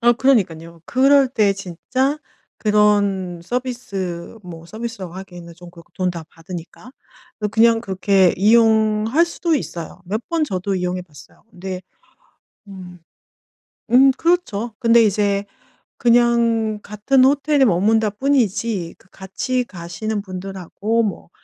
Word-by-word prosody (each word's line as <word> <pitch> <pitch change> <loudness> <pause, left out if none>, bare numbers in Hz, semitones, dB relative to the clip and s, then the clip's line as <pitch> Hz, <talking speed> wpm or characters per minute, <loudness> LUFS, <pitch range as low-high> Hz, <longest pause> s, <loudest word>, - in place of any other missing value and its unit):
아 240 0 +5
그러니깐요. 170 -11 0
그럴 270 +1 +4
때 210 -5 +2
진짜 220 - -2 0.4
그런 205 -4 +1
서비스 200 -6 -5
뭐 165 -3 -10
서비스라고 220 -4 -7
하기에는 175 -3 -10
좀 175 0 -13
그렇고 170 -1 -17
돈 185 -1 -1
다 170 -2 -7
받으니까 175 +8 -10 0.6
그냥 225 +1 +4
그렇게 190 -3 +2
이용할 220 - +3
수도 340 -1 -1
있어요. 175 - -5
몇 205 +5 -3
번 335 -2 +1
저도 195 -6 -3
이용해 180 0 -2
봤어요. 150 -5 -18
근데 185 -1 -7 0.9
음. 180 -3 -11 0.9
음 265 +3 +6
그렇죠. 255 - -1
근데 235 -1 +5
이제 200 -1 +1 0.5
그냥 235 -2 +2
같은 215 +6 +2
호텔에 285 0 +3
머문다 215 +2 +2
뿐이지 220 -6 -1
그 190 - -27
같이 250 +7 -3
가시는 200 +2 -5
분들하고 195 +3 -3
뭐 200 -6 -4
210 Hz, 265 characters per minute, -20 LUFS, 180-235 Hz, 0.9 s, 음